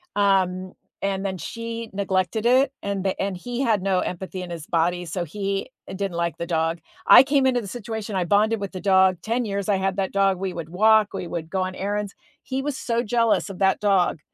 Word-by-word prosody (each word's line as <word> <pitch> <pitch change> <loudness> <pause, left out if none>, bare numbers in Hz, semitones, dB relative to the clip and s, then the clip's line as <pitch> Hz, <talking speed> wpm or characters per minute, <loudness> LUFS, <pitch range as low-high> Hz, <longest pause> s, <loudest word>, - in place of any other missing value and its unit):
um, 185 -2 +1 0.3
and 195 0 -1
then 190 -1 -2
she 230 +3 -6
neglected 195 +3 -1
it, 260 +2 +4
and 200 -1 -3
and 195 -2 -2
he 245 +6 -4
had 225 -7 +2
no 190 -2 +2
empathy 185 +1 -4
in 180 - -7
his 165 -3 -6
body, 175 +2 0
so 175 +2 -3
he 195 - -3 0.2
didn't 190 -1 -3
like 170 -2 -1
the 170 - -4
dog. 165 0 0 0.3
I - - +10
came 275 -1 +2
into 245 -2 +2
the 200 - -8
situation, 220 -1 -5
I 185 - +1
bonded 210 +4 +2
with 200 - -4
the 185 - -7
dog, 190 -2 +4
10 230 +4 -1
years 200 -1 -3
I 205 - +4
had 190 0 -1
that 195 -1 -1
dog, 195 -2 +2
we 190 -1 -2
would 165 -2 -6
walk, 215 +3 +4
we 185 -3 -4
would 165 -1 -5
go 190 - -1
on 185 0 -4
errands. 205 +1 -3 0.3
He 265 0 -3
was 295 -2 -2
so 235 0 -1
jealous 230 -2 +1
of 185 - -10
that 190 -1 +3
dog, 195 -5 +2
195 Hz, 220 wpm, -24 LUFS, 185-220 Hz, 0.3 s, I